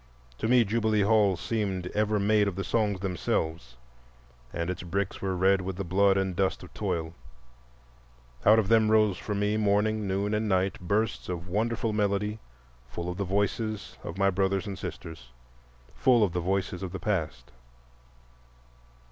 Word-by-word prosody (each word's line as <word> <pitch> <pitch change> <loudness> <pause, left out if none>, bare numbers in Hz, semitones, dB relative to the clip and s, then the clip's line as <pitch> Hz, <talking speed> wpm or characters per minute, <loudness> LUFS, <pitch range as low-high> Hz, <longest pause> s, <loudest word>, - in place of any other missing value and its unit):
To 110 - -1
me 125 0 +5
Jubilee 110 0 +1
Hall 105 -3 +3
seemed 95 -3 -2
ever 105 0 +1
made 105 +1 +3
of 100 - -2
the 95 - -3
songs 105 -4 0
themselves, 80 -7 -2 0.7
and 85 0 -3
its 90 - -5
bricks 95 +2 -3
were 95 -1 -1
red 95 +1 +3
with 95 0 -4
the 100 - -4
blood 95 +2 +3
and 95 -2 -1
dust 95 +1 0
of - - -13
toil. 80 -1 -3 1.3
Out 110 +2 +6
of 110 -3 +2
them 110 0 +4
rose 110 -4 +3
for 105 - -4
me 105 +1 0
morning, 105 0 +1
noon, 100 +2 -1
and 105 0 0
night, 95 0 +1
bursts 100 +4 -1
of 90 0 -4
wonderful 110 +3 -1
melody, 105 +1 0 0.5
full 85 +7 -5
of 90 - -7
the 100 - -1
voices 105 +2 -2
of 85 - -6
my 100 0 +3
brothers 95 +1 0
and 100 -2 -6
sisters, 80 -8 -8 0.6
full 120 -4 +4
of 95 -5 0
the 90 - -1
voices 95 0 -1
of 95 -1 -5
the 95 - -4
past. - - -3
100 Hz, 165 wpm, -28 LUFS, 90-105 Hz, 1.3 s, Out